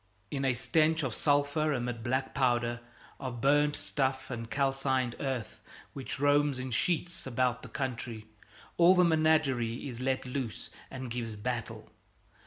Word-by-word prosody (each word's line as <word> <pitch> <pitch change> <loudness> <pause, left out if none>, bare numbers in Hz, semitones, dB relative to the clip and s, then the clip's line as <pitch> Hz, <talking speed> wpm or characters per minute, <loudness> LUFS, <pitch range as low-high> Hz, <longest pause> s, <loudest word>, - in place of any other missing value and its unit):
In 140 -1 -2
a 130 -2 +2
stench 160 +4 +2
of 130 -5 -1
sulphur 145 +2 +2
amid 120 -3 -2
black 130 +2 -1
powder, 120 -3 +1 0.4
of 125 -3 -5
burned 145 +3 +3
stuffs 130 -1 -1
and 115 -2 -5
calcined 135 -3 0
earth 130 -5 -3 0.3
which 135 -1 -5
roams 145 -1 +3
in 130 0 -4
sheets 170 +5 0
about 125 -1 0
the 125 - -10
country, 120 -3 -4 0.5
all 175 +2 +7
the 180 - +5
menagerie 155 -8 +2
is 120 -3 -6
let 130 0 0
loose 125 -3 -4 0.2
and 130 -2 -6
gives 115 -2 -3
battle. 120 +2 -4
130 Hz, 145 wpm, -31 LUFS, 120-145 Hz, 0.5 s, all